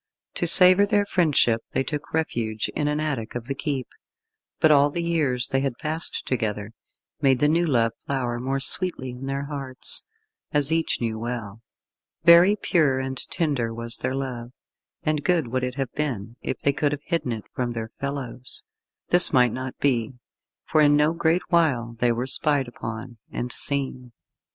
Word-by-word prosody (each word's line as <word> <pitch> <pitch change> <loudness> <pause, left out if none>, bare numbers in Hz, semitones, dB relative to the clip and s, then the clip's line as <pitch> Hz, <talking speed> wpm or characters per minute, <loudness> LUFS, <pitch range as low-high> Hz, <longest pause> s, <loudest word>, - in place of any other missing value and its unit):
To 175 - -1
savour 185 +3 +7
their 205 -1 +2
friendship 150 - +2
they - - +1
took 150 +1 -6
refuge 115 -9 -2
in 145 - -1
an 150 0 -1
attic 135 -9 -3
of 120 -1 -5
the 135 - -3
keep, 135 -2 -3 0.7
but 155 - +4
all 145 0 +5
the 170 +4 -4
years 145 -8 0
they 135 - +1
had 135 -3 -2
passed 160 +2 -1
together, 105 -4 -3 0.5
made 135 -3 +3
the 145 - +2
new 170 +3 +2
love 115 -5 +2 0.2
flower 125 -3 -2
more 135 +2 -2
sweetly 135 -3 +3
in 125 +2 -8
their 140 +1 -3
hearts, 135 -3 -2 0.5
as 145 0 +1
each 165 0 +1
knew 110 -2 -2
well. 115 -2 -6 0.6
Very 170 +4 +7
pure 155 -10 +1
and 130 0 -4
tender 140 -9 -1
was 115 0 -3
their 130 - -3
love, 125 -3 -5 0.5
and 150 -1 -1
good 170 -9 +1
would 130 +1 -2
it 125 0 -3
have 135 -3 -3
been 120 -7 -3
if - - -3
they 140 - 0
could 145 0 0
have 145 0 -6
hidden 165 -7 -2
it 110 -2 -5
from 125 -1 -3
their 115 -1 -6
fellows. 135 -3 -5 0.5
This 175 +1 +9
might 125 -3 +3
not 130 0 -6
be, 125 -4 0 0.5
for 155 - +2
in 145 -1 +5
no 150 +2 +2
great 170 +1 +1
while 130 -9 +1
they 120 0 +2
were 120 +2 -2
spied 140 0 +1
upon, 115 0 -8
and 125 0 -4
seen. 130 -3 -2
135 Hz, 175 wpm, -24 LUFS, 120-150 Hz, 0.7 s, This